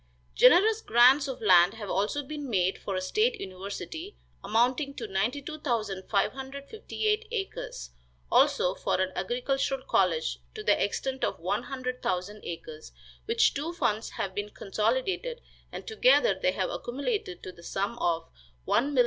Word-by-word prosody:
Generous 410 - +6
grants 255 - +5
of 265 -4 -6
land 180 0 +6
have 215 -2 -7
also 210 +9 0
been 290 0 -6
made 190 -3 +1
for 195 - -4
a 185 - -1
state 430 - +1
university, 200 - -7 0.3
amounting 250 +7 +1
to 230 - -5
92,558 270 - -2
acres; 390 - -5 0.4
also, 180 - +4
for - - -1
an 185 0 0
agricultural 260 +6 -1
college 160 - +1 0.2
to - - -6
the - - +3
extent 265 +6 -2
of - - -1
one 195 +6 -1
hundred 255 -1 -4
thousand 190 +4 -2
acres, 160 -2 -8 0.3
which 455 0 +3
two 310 +4 -3
funds 230 -9 0
have 190 - -4
been 205 +1 -3
consolidated, 260 - -1 0.3
and - - -7
together - - +4
they - - 0
have - - -1
accumulated 275 - -3
to 185 - -6
the 175 - -16
sum 195 +5 -2
of 165 -1 +1 0.4
$1,159,790. 270 +3 +2
245 Hz, 140 wpm, -28 LUFS, 195-295 Hz, 0.4 s, Generous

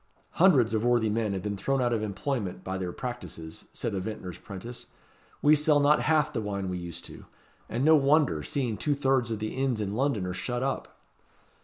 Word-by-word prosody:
"Hundreds 140 - +5
of 110 0 +1
worthy 120 -3 +3
men 110 -1 0
have 95 -2 -3
been 105 -1 -2
thrown 135 +8 0
out 120 -1 +2
of 110 - 0
employment 105 -3 -3
by 95 - -3
their 90 -2 -3
practices," 120 -10 -7
said - - -3
a 95 - -1
vintner's 95 -3 -6
'prentice. 110 +5 -8 0.6
"We 150 - +7
sell 150 0 +4
not 145 +1 +4
half 155 -2 +2
the 115 - -1
wine 100 -2 -3
we 90 -1 -3
used 85 -1 -7
to - - -10
do. - - -14 0.4
And 120 +5 -1
no 160 0 +7
wonder! 140 - +3
seeing 120 - -2
two 145 +8 0
thirds 135 -3 +1
of 110 - -2
the 110 +1 -4
inns 130 -3 0
in 100 -1 -2
London 120 -5 0
are 90 - -3
shut 120 +6 -2
up." 135 0 -3
115 Hz, 210 wpm, -28 LUFS, 100-135 Hz, 0.6 s, We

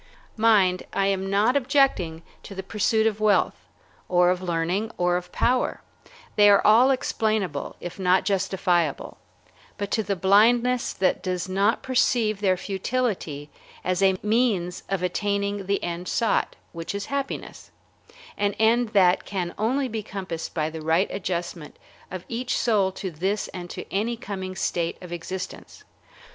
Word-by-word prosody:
Mind, 205 -5 +4
I 195 - +1
am 195 -1 0
not 210 +6 +3
objecting 255 - +2 0.2
to 200 - -10
the 190 - -5
pursuit 220 +2 +1
of 215 -1 0
wealth, 215 -1 +3 0.6
or 180 0 +4
of 180 0 -2
learning, 180 +4 -1
or 175 0 +2
of 180 0 -4
power, 250 +1 0 0.5
they 205 0 +7
are 200 - +5
all 230 +5 +6
explainable, 215 - -1
if 175 +2 -8
not 185 0 +3
justifiable, 185 -5 0 0.6
but 200 -1 -4
to 220 - +2
the 200 -1 -2
blindness 235 +7 +3
that 190 - 0
does 185 -1 -2
not 195 +4 +1
perceive 235 -5 +1
their 185 -2 +2
futility 190 - -3 0.3
as 185 +1 0
a 190 -1 +4
means 210 -5 +1
of 195 -2 -1
attaining 200 +1 -1
the 200 0 0
end 175 +1 -4
sought, 230 -2 0 0.2
which 165 +3 -5
is 200 0 -3
happiness, 280 -1 -4 0.7
an 205 0 +1
end 230 +1 +2
that 185 -2 +4
can 180 -3 -3
only 260 +5 0
be 220 -2 -4
compassed 190 -5 -6
by 155 -2 0
the 160 0 -7
right 160 +5 +2
adjustment 175 -4 -4 0.3
of 185 -1 -7
each 245 +2 -2
soul 205 -5 +2
to 190 0 -5
this 190 +6 -2
and 175 -1 -8
to - - -7
any 225 +4 0
coming 190 -5 -6
state 170 -2 -1
of 180 -2 -11
existence. 180 +2 -7
195 Hz, 155 wpm, -25 LUFS, 180-220 Hz, 0.7 s, they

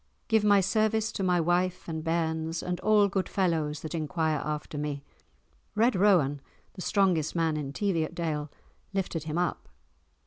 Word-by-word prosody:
Give 220 -2 +3
my 205 -1 +5
service 220 +2 +1
to - - -4
my 180 -2 +2
wife 175 +2 0
and 160 -2 -4
bairns 160 0 -1
and 180 0 -2
all 210 -1 +4
good 195 -1 -2
fellows 160 -6 0
that 155 - -6
enquire 160 -1 0
after 150 0 -4
me." 145 -1 -3 0.7
Red 230 +2 +3
Rowan, 175 -8 +3 0.3
the 185 - -9
strongest 180 -6 +1
man 165 -2 +1
in 145 -3 -3
Teviotdale, 165 -4 -1 0.4
lifted 175 -5 -2
him 155 +1 -3
up. 175 -1 -2
170 Hz, 150 wpm, -28 LUFS, 155-195 Hz, 0.7 s, my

